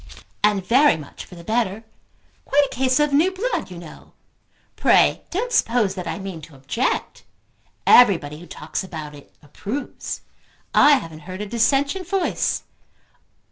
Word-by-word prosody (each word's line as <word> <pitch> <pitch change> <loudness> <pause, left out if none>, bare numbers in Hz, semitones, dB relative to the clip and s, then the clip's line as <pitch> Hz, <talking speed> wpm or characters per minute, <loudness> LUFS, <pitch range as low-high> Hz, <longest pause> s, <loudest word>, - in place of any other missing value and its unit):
"And 205 -3 +2
very 260 - +4
much 150 -2 -10
for 180 - -14
the 170 - -11
better. 220 +1 -1 0.6
Quite 290 +1 +3
a - - -8
case 260 +2 +2
of 295 -1 +2
new 315 +6 +4
blood, 410 - -3
you 180 - -9
know. 170 -2 -13 0.6
Pray - - +4
don't 465 +7 -2
suppose 230 - +2
that 180 -3 -6
I - - -3
mean 190 -5 -7
to 150 -1 -13
object. 145 - -2 0.6
Everybody 165 -11 +5
who 175 - -12
talks 155 +4 -5
about 155 -5 -7
it 145 -1 -15
approves. 215 - -6 0.5
I 295 - +7
haven't 165 - -2
heard 185 +2 -6
a - - -3
dissentient 275 - +1
voice. 385 -2 0
210 Hz, 150 wpm, -22 LUFS, 170-280 Hz, 0.6 s, I